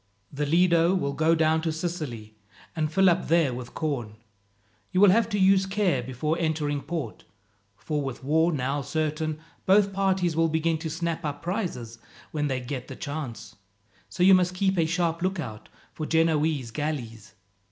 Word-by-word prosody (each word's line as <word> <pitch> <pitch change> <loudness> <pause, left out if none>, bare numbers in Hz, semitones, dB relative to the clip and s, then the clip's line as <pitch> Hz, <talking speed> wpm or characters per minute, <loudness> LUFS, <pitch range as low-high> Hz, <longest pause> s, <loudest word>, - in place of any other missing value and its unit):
"The 145 +1 -2
Lido 170 +2 +4
will 140 -7 -1
go 160 +3 +3
down 160 0 +2
to 160 -1 -1
Sicily, 155 -10 -5 0.4
and 155 -2 -1
fill 190 +2 +4
up 180 0 +2
there 165 -5 +3
with 120 -1 -8
corn. 125 -9 -3 0.8
You 185 - +1
will 200 -1 +7
have 225 +2 +3
to 205 - -1
use 190 0 +4
care 190 -9 +1
before 130 +6 -2
entering 150 -3 -1
port, 160 0 -5 0.5
for 150 +6 -3
with 135 -2 -5
war 160 +5 +2
now 140 -1 -1
certain, 155 +1 -2 0.3
both 195 +1 +4
parties 190 -3 +1
will 165 0 +2
begin 160 0 0
to 160 0 -4
snap 165 +1 -3
up 145 -1 -4
prizes 165 - -4 0.3
when 150 -1 -1
they 130 -2 -1
get 125 0 -6
the - - -8
chance. 140 -6 -6 0.5
So 180 - -1
you 190 +1 +8
must 180 0 +3
keep 190 +1 +1
a 160 - +2
sharp 170 0 0
lookout 160 - -4 0.2
for 155 - -5
Genoese 155 -6 +1
galleys. 115 -9 -5
160 Hz, 170 wpm, -26 LUFS, 140-175 Hz, 0.8 s, you